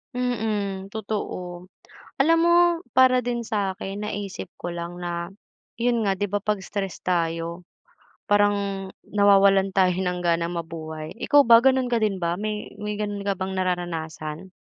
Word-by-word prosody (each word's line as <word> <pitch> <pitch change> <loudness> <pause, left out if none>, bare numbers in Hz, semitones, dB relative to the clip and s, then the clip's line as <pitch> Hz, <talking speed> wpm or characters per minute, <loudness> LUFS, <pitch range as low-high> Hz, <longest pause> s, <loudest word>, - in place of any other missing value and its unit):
Mm, 210 -6 -2
totoo. 185 -4 -5 0.5
Alam 330 +4 +5
mo 345 0 +5 0.4
para 255 -1 +5
din 240 -1 -1
sa 205 -4 -1
akin 195 +2 -6
naisip 200 -3 -5
ko 175 - -4
lang 175 +1 -6
na, 175 +1 -4 0.5
'yon 235 -2 +2
nga, 195 - +2
'di 205 +1 -2
ba 205 +1 -2
'pag 210 -2 0
stress 195 -1 -5
tayo 170 0 -1 0.6
parang 200 -2 +1 0.2
nawawalan 195 -1 +4
tayo 185 -2 +3
ng 180 -1 -1
ganang 170 0 0
mabuhay. 160 -1 -7
Ikaw 285 +3 +4
ba, 230 0 +8
gano'n 260 -1 +3
ka 235 -2 0
din 200 -3 +1
ba, 170 -1 0
may 210 +2 -4
may 210 0 -4
gano'n 205 -1 -3
ka 195 -1 0
bang 190 0 -3
nararanasan? 175 -2 -3
195 Hz, 150 wpm, -24 LUFS, 175-210 Hz, 0.6 s, ba